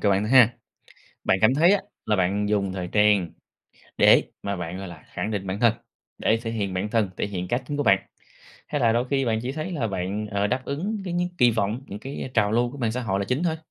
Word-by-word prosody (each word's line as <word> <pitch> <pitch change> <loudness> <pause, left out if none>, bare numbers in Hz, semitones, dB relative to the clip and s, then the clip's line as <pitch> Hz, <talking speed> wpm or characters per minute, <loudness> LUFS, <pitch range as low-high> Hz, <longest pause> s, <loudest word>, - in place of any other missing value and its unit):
cho 100 - +2
bạn 100 +1 +2
thôi 105 - -3
ha. 125 -3 +7 0.7
Bạn 95 - +3
cảm 110 +4 +5
thấy 170 +7 +5
á 200 - +2 0.2
là 105 - +2
bạn 100 +3 +1
dùng 100 -3 0
thời 90 -2 -4
trang 105 -4 +4 0.7
để - - +6 0.2
mà 100 -1 -2
bạn, 85 +1 -5
gọi 95 -1 -6
là, 85 -3 -12
khẳng 110 - -3
định 100 -2 -3
bản 95 +2 -3
thân, 115 -2 +4 0.4
để 110 - +2
thể 115 - -3
hiện 100 -4 -2
bản 100 +3 -2
thân, 110 -5 +1
thể - - -1
hiện 90 -3 -5
cá 120 - +1
tính 135 +3 -6
của 145 - 0
bạn, - - +5 0.7
hay 145 - -2
là 115 -2 +4
đôi 120 +2 0
khi 135 -1 +1
bạn 110 -2 +1
chỉ 125 - -3
thấy 155 +5 -4
là 130 -9 -1
bạn, 95 +2 -3
ờ, 100 +1 +1
đáp 125 +3 -2
ứng 195 +11 -3
cái 180 - -4
những 175 0 0
kỳ 125 -2 +6
vọng, 110 +2 -1
những 100 - -7
cái 130 +1 -6
trào 105 -2 +2
lưu 120 +1 +2
của 145 - -9
mạng 115 -4 0
xã 125 - -2
hội 95 -4 -1
là 100 - -1
chính 125 - -1
thôi? 160 -2 0
110 Hz, 265 wpm, -25 LUFS, 100-130 Hz, 0.7 s, ha